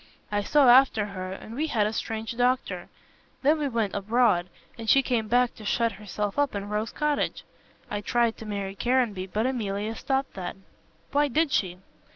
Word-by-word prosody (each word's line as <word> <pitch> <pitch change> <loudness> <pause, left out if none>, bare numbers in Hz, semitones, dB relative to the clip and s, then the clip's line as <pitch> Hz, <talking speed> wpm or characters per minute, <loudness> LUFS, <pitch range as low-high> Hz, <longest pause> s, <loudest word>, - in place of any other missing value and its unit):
I 205 0 +1
saw 280 +6 +4
after 245 -4 +6
her 185 -2 -6
and 205 +3 -8
we 300 +6 -1
had 220 -8 +1
a 215 - -1
strange 225 +1 -4
doctor. 250 +1 0 0.5
Then 305 +3 +4
we 295 - 0
went 230 -6 -1
abroad, 205 -3 +2 0.3
and 225 -1 -5
she 275 - +6
came 235 -4 0
back 245 +2 +3
to 215 - -13
shut 230 +2 +1
herself 210 +3 -4
up 285 -6 +1
in 200 0 -4
Rose 210 +2 -1
Cottage. 300 -1 -1 0.4
I 205 - -3
tried 235 +1 +1
to 220 - -9
marry 200 -2 -3
Caranby, 230 -4 0
but 215 +4 -1
Emilia 215 -4 -2
stopped 270 +4 -2
that." 185 -2 -5 0.6
"Why 290 +1 +3
did 305 +2 +1
she?" 180 -8 0
225 Hz, 185 wpm, -26 LUFS, 205-255 Hz, 0.6 s, after